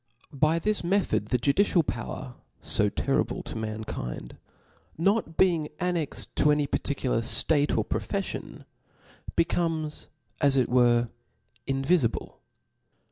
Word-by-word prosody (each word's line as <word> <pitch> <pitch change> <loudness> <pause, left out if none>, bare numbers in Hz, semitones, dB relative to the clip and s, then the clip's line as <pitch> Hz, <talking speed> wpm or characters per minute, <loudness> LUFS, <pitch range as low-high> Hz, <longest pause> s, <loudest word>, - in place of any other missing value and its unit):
By 155 +4 +2
this 210 +4 0
method 195 +3 +1
the 125 - +2
judicial 165 - +3
power^ 125 0 -5 0.5
io 105 -1 +4
terrible - - -1
to - - -7
mankind, 110 - -5 0.6
not 195 -1 +1
being 170 -5 +3
annexed 175 -4 -2
to 150 - +4
any 150 0 +3
particular 135 -3 -1
ftate 145 +5 +2
or - - +1
profeffion, - - -4 0.7
becomes, 165 -3 0 0.3
as 140 -2 +4
it 130 - +2
were, 120 -1 +4 0.6
invifi 135 0 +2
ble. - - -8
145 Hz, 115 wpm, -27 LUFS, 125-170 Hz, 0.7 s, io